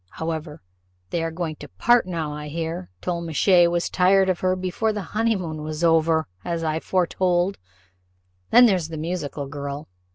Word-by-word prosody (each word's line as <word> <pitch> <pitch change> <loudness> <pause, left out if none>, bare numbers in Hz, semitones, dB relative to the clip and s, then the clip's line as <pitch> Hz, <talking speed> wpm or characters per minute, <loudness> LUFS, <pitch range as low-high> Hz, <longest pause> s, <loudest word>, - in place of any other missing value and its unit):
However, 160 - -5 0.5
they 170 - 0
are 165 - -1
going 160 -2 -4
to - - -9
part 235 - +3
now, 165 -4 -3
I 150 0 -6
hear: 160 - -4
Tollemache 170 +1 +3
was 175 0 0
tired 190 +1 +3
of 185 - 0
her 185 0 +1
before 185 +4 -1
the 210 -2 -4
honey 225 +1 +2
moon 160 -5 -4
was 155 +2 -4
over, 165 -1 +3 0.2
as 170 -1 -2
I 160 0 0
foretold. 180 +1 0 0.9
Then 245 - +8
there's 185 -8 +2
the 160 -1 -7
musical 155 -3 -4
girl. 140 -1 -6
170 Hz, 165 wpm, -23 LUFS, 155-185 Hz, 0.9 s, Then